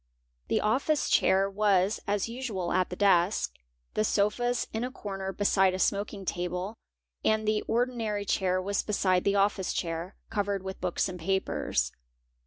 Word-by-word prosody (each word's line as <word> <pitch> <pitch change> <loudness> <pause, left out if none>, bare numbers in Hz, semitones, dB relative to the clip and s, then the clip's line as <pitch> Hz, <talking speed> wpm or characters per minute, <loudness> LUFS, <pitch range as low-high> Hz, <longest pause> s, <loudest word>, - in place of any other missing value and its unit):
The - - +1
office 270 +8 +1
chair 190 +1 +4
was 200 0 +2
as 205 0 0
usual 230 -7 -3
at 185 0 +2
the 180 - -5
desk, 190 -1 +3 0.4
the 215 - +1
sofas 220 +4 +1
in 220 +1 -1
a 250 - -2
corner 195 -6 -5
beside 195 -1 +3
a - - -2
smoking 200 +1 -1
table, 180 +4 -3 0.5
and 220 0 +2
the 215 0 +2
ordinary 225 -4 0
chair 185 -1 +1
was 200 +2 0
beside 185 -3 +1
the 200 - +3
office 200 -1 +1
chair, 170 +2 -3 0.2
covered 200 -2 -1
ith 190 0 -6
books 180 +1 0
and 180 -1 -6
papers. 165 - 0
200 Hz, 155 wpm, -29 LUFS, 185-215 Hz, 0.5 s, chair